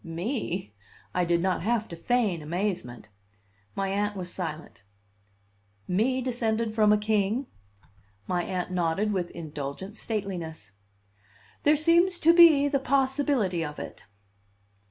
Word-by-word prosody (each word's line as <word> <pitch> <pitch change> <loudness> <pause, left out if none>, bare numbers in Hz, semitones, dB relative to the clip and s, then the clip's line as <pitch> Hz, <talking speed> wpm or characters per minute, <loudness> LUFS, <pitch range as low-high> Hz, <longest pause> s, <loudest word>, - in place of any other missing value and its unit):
"Me!" 180 - -4 0.4
I 180 - +1
did 170 0 +2
not 185 0 0
have 225 +3 0
to 170 - -6
feign 210 -3 0
amazement. 155 - -3 0.7
My 195 0 -1
Aunt 205 +1 -1
was 180 -1 -4
silent. 160 - -6 1.1
"Me 245 +8 +1
descended 230 -3 -1
from 215 -1 +4
a 210 - +5
king?" 215 +4 0 0.8
My 175 +9 -1
Aunt 185 -1 -3
nodded 180 +4 0
with 180 -3 -1
an - - -16
indulgent 155 +5 -6
stateliness. 180 - -4 0.9
"There 295 +1 +4
seems 340 +4 +3
to 335 +2 +6
be 325 -5 +7
the 280 -1 +1
possibility 265 - +1
of 150 -1 -6
it." - - -8
200 Hz, 130 wpm, -27 LUFS, 175-245 Hz, 1.1 s, be